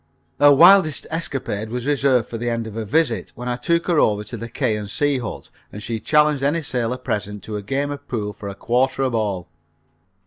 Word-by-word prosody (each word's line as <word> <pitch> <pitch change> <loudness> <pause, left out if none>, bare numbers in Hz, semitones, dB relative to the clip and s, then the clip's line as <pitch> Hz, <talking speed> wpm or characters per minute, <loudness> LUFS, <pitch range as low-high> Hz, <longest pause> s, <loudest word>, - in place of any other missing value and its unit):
Her 145 0 +7
wildest 170 +1 +6
escapade 135 -9 -3
was 125 +1 -4
reserved 135 -5 +2
for 115 - -6
the 120 +1 -1
end 115 -1 -2
of 110 - -8
her 110 0 -4
visit, 130 +1 0
when 125 +1 -7
I 125 - 0
took 170 +7 0
her 170 -4 +2
over 105 -4 +2
to 120 - -7
the 115 +1 -7
K. 115 -2 0
of 105 -1 -6
C. 145 +1 0
hut, 115 -4 -7 0.2
and 105 - -8
she 115 +1 -3
challenged 150 +1 +3
any 150 +4 0
sailor 125 -3 -1
present 105 -4 -4
to 110 - -6
a 105 - -3
game 140 +7 -2
of 145 - -8
pool 105 -4 -3
for 100 0 -8
a 100 - -7
quarter 130 +5 0
a 130 - 0
ball. 100 -6 -2
125 Hz, 220 wpm, -21 LUFS, 110-145 Hz, 0.2 s, Her